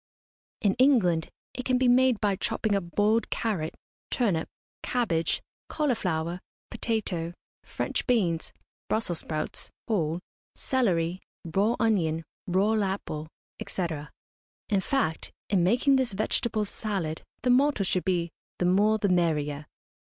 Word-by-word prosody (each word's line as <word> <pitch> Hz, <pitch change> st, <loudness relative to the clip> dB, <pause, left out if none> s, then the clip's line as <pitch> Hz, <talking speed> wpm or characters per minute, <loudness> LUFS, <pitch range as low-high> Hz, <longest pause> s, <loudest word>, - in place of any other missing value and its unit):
In 200 Hz, -3 st, +3 dB
England 200 Hz, -, +4 dB, 0.2 s
it 255 Hz, -, -4 dB
can 255 Hz, 0 st, +2 dB
be 255 Hz, 0 st, +3 dB
made 250 Hz, -2 st, +5 dB
by 205 Hz, -2 st, +2 dB
chopping 210 Hz, +2 st, 0 dB
up 180 Hz, -4 st, -2 dB
boiled 215 Hz, +2 st, +3 dB
carrot, 195 Hz, -9 st, -1 dB, 0.3 s
turnip, 200 Hz, -10 st, +1 dB, 0.3 s
cabbage, 170 Hz, -10 st, 0 dB, 0.3 s
cauliflower, 180 Hz, -, -1 dB, 0.3 s
potato, 175 Hz, -7 st, -2 dB, 0.3 s
French -, -, -3 dB
beans, 180 Hz, -10 st, +1 dB, 0.4 s
Brussels 180 Hz, -7 st, 0 dB
sprouts 155 Hz, -1 st, -3 dB, 0.2 s
(whole), 170 Hz, -6 st, 0 dB, 0.4 s
celery, 185 Hz, -9 st, +1 dB, 0.3 s
raw 200 Hz, +8 st, +2 dB
onion, 165 Hz, -8 st, +1 dB, 0.2 s
raw 195 Hz, +4 st, +3 dB
apple, 190 Hz, -6 st, -3 dB, 0.4 s
&c. 185 Hz, -, -1 dB, 0.8 s
In 200 Hz, -3 st, +2 dB
fact, 260 Hz, -, -1 dB, 0.2 s
in 190 Hz, -4 st, +4 dB
making 250 Hz, +8 st, +4 dB
this 255 Hz, -5 st, 0 dB
vegetable 215 Hz, +1 st, 0 dB
salad 195 Hz, -7 st, -3 dB, 0.2 s
the 250 Hz, -, +4 dB
motto 270 Hz, -3 st, +4 dB
should 185 Hz, -1 st, +1 dB
be 175 Hz, -3 st, 0 dB, 0.3 s
"the 180 Hz, -, 0 dB
more 205 Hz, +4 st, +4 dB
the 205 Hz, -, +1 dB
merrier." 150 Hz, -5 st, +1 dB
195 Hz, 125 wpm, -28 LUFS, 170-230 Hz, 0.8 s, made